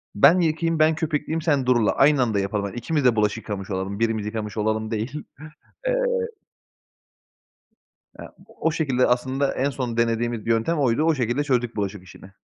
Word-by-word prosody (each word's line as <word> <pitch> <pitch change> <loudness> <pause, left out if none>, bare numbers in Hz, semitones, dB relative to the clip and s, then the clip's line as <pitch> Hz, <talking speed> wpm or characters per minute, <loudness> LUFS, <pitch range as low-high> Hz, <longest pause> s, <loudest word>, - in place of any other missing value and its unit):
Ben 170 - +6
yıkayayım, 165 -1 0
ben 155 +1 +4
köpükleyeyim, 160 0 -2
sen 145 -5 +1
durula. 120 -4 +3
Aynı 145 0 +4
anda 110 -5 +1
yapalım. 100 +1 -2
Hani, 100 - -6
ikimiz 145 +3 -1
de 120 - +5
bulaşık 105 0 +1
yıkamış 100 -3 -6
olalım, 95 +2 -3
birimiz 115 -2 0
yıkamış 105 -1 -5
olalım 110 +1 -1
değil." 120 +7 -3 0.6
Eee - - +2 2.3
Ya, - - -11
o 160 - -2
şekilde 135 -6 +1
aslında 130 +3 0
en 135 +2 +1
son 125 -4 -4
denediğimiz 115 -1 0
yöntem 115 +9 +1
oydu. 130 +2 +2
O 160 0 +3
şekilde 125 +2 0
çözdük 125 -4 0
bulaşık 100 -2 -3
işini. 95 +1 -14
120 Hz, 165 wpm, -23 LUFS, 110-145 Hz, 2.3 s, Ben